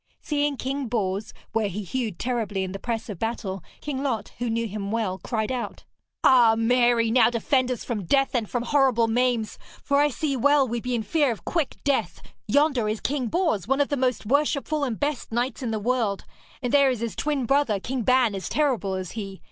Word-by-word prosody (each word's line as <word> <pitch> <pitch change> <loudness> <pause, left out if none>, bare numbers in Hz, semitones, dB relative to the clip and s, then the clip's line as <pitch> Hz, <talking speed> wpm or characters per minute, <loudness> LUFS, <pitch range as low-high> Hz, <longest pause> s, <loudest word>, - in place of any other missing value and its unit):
Seeing 290 -2 -1
King 270 +1 -3
Bors, 205 -3 -2 0.2
where 225 -1 +1
he 200 +2 -4
hewed 220 -2 -3
terribly 225 -6 -2
in 185 - -4
the 195 - -6
press 230 -1 -3
of 205 -7 -7
battle, 200 -5 -3 0.2
King 275 -3 -3
Lot, 245 -7 -2
who 240 -1 -1
knew 230 0 -1
him 200 -1 -5
well, 210 -4 -1
cried 220 +2 -2
out: 250 -2 -4 0.4
'Ah, 240 -4 +6
Mary, 235 0 +3
now 235 -1 +5
defend 250 +2 +1
us 250 -3 -3
from 210 -6 -3
death 270 +8 +2
and 230 -5 -1
from 245 -1 -1
horrible 255 -4 +3
maims, 235 -1 0 0.2
for 280 - +2
I 290 +1 +5
see 290 +1 -2
well 280 +2 +4
we 235 0 -3
be 250 +1 -2
in 225 - -1
fear 290 +2 +2
of 205 -7 -7
quick 330 -5 -1
death! 280 -1 0 0.3
Yonder 280 -7 +2
is 215 0 -2
King 270 -3 -1
Bors, 320 - 0
one 270 +2 +1
of 285 - +2
the 285 - 0
most 255 -5 0
worshipful 285 +3 +1
and 240 -6 -2
best 290 -5 -2
knights 240 +3 -1
in 245 - -2
the 220 - -1
world; 220 -2 -1 0.4
and 245 - -1
there 280 -1 +6
is 250 -4 -2
his 230 -6 -3
twin 290 -4 -1
brother, 270 -5 +2
King 255 +5 -3
Ban, 250 -2 +3
as 190 -3 -4
terrible 250 -10 0
as 185 -2 -5
he. 195 -3 -6
240 Hz, 210 wpm, -25 LUFS, 220-270 Hz, 0.4 s, Ah